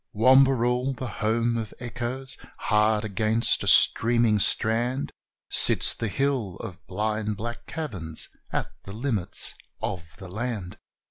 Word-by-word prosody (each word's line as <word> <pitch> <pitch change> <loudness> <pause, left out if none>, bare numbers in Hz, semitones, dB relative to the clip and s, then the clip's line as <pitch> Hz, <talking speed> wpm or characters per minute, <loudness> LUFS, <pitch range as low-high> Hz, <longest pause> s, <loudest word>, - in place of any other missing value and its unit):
Wamberal, 130 +1 +4
the 130 - -4 0.2
home 115 +2 +1
of 110 -2 -5
echoes! 125 +2 -3 0.2
Hard 105 0 +2
against 110 +3 +1
a - - -4
streaming 115 -2 +6
strand, 120 +7 0 0.4
Sits - - +3
the 115 - -3
hill 125 -5 -1
of 90 - -9
blind 105 +2 -2
black 120 +2 -6
caverns, 95 - -3 0.2
at - - -2
the 100 - -9
limits 110 -5 -1 0.3
of 80 -3 -5
the 95 - -9
land. 105 -2 -5
115 Hz, 125 wpm, -25 LUFS, 105-125 Hz, 0.4 s, streaming